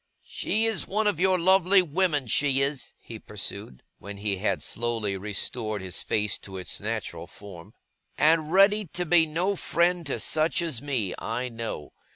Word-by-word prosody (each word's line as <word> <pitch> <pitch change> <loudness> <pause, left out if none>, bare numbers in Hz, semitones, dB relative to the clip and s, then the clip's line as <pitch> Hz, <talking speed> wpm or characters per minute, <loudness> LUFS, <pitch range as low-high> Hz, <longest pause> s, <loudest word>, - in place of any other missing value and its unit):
'She 220 +2 0
is 225 -3 0
one 215 +3 0
of 205 -6 +1
your 185 0 +3
lovely 190 +2 +5
women, 160 -3 0
she 135 +4 +2
is,' 140 0 -2
he 115 -2 -10
pursued, 100 - -5 0.2
when 100 0 -8
he 100 -1 -1
had 100 - -1
slowly 115 -4 -2
restored 105 +2 -3
his 95 -2 -4
face 105 -2 0
to 95 -1 -9
its 90 - -5
natural 105 -6 -4
form; 95 -5 -12 0.5
'and 155 0 +3
ready 200 +3 +5
to 175 +3 -3
be 165 -1 +5
no 175 +6 -1
friend 170 -2 +1
to 140 - -2
such 155 +3 +1
as 165 -9 -2
me, 130 -10 -2
I 120 +3 -3
know. 115 -10 -6
135 Hz, 170 wpm, -26 LUFS, 105-175 Hz, 0.5 s, lovely